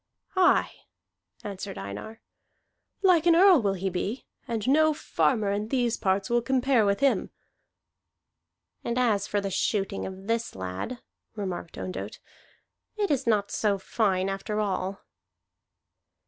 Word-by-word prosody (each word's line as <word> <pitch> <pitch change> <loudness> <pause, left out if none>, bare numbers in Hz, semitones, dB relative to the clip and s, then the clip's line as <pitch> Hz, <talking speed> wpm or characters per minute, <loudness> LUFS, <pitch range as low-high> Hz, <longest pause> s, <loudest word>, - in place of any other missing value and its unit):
"Aye," 370 -1 +4 0.7
answered 200 -1 -6
Einar. 100 - -7 0.8
"Like 350 -3 +5
an 335 - +6
Earl 365 -4 +7
will 200 -2 0
he 190 +1 -3
be, 200 +7 -3 0.2
and 225 -2 -3
no 310 +3 +4
farmer 220 -8 +1
of 210 +2 -2
these 245 -3 +1
parts 190 0 0
will 240 0 +2
compare 255 -2 +2
with 200 +4 +1
him." 275 -1 +2 1.5
"And 235 +1 -2
as 220 -6 +2
for 205 - 0
the 200 -1 -3
shooting 195 +1 -1
of 190 0 -9
this 230 +1 -1
lad," 95 - -5 0.3
remarked 185 -5 -5
Ondott, 95 +2 -5 0.8
"it 410 -4 0
is 265 -3 0
not 205 -3 +2
so 205 -2 +1
fine 190 -1 0
after 195 +2 -3
all." 195 -1 -2
210 Hz, 135 wpm, -27 LUFS, 195-250 Hz, 1.5 s, Earl